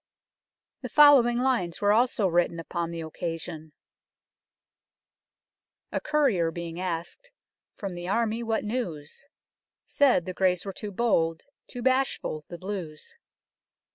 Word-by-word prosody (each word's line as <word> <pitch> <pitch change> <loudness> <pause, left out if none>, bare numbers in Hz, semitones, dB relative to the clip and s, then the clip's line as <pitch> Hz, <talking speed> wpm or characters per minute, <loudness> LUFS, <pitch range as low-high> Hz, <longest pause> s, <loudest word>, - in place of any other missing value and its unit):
The - - -6
following 275 -5 +6
lines 245 -10 0
were 205 0 +3
also 230 -2 +2
written 170 -1 +1
upon 165 +1 -3
the 170 -1 -5
occasion 160 0 -6 0.7
" - - -64
A - - -2
Courier 270 - +2
being 170 0 -6
ask'd, 180 - -5 0.5
from 195 -3 -5
the 175 0 -6
Army 225 +3 0
what 225 -1 -1
news? 210 - -5 0.6
Said, 265 - +3
the 185 - -4
Greys 180 0 +1
were 195 - -5
too 210 +1 -6
bold, 165 -7 +1 0.2
too 245 -1 -7
bashfull 260 - 0
the 175 - -8
Bleus." 185 - -7
185 Hz, 125 wpm, -27 LUFS, 170-240 Hz, 0.7 s, following